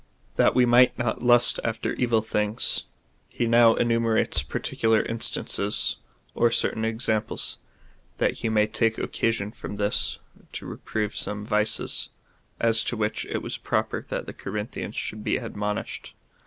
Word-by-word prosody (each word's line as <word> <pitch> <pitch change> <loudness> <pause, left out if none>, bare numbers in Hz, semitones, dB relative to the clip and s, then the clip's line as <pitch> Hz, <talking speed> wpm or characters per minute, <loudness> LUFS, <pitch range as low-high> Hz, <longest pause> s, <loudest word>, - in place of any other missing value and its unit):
That - - +3
we 125 - +5
might 120 +1 +5
not 120 -2 -2
lust 120 -1 +6
after 115 -1 -2
evil 115 -3 +1
things. 105 +1 +1 0.4
He 120 - -2
now 115 0 +6
enume 115 -1 +1
rates 110 - +2
particular 110 -1 0
instances, 105 -2 0 0.4
or 120 - +3
certain 110 -1 +1
examples, 110 -1 -1 0.6
that - - 0
he 115 - -1
may 105 -1 +3
take 115 +1 0
occasion 110 -3 -1
from 105 - -7
this 100 0 0 0.4
to - - -5
reprove 105 -1 -4
some 105 0 -3
vices, 105 0 -1 0.5
as 115 -1 +3
to 120 - -1
which 110 0 -1
it - - -3
was - - -4
proper - - -1
that - - -3
the - - -8
Corinthians 105 +1 -5
should 105 0 -4
be - - +1
admonished. 105 -3 -4
110 Hz, 145 wpm, -25 LUFS, 105-115 Hz, 0.6 s, lust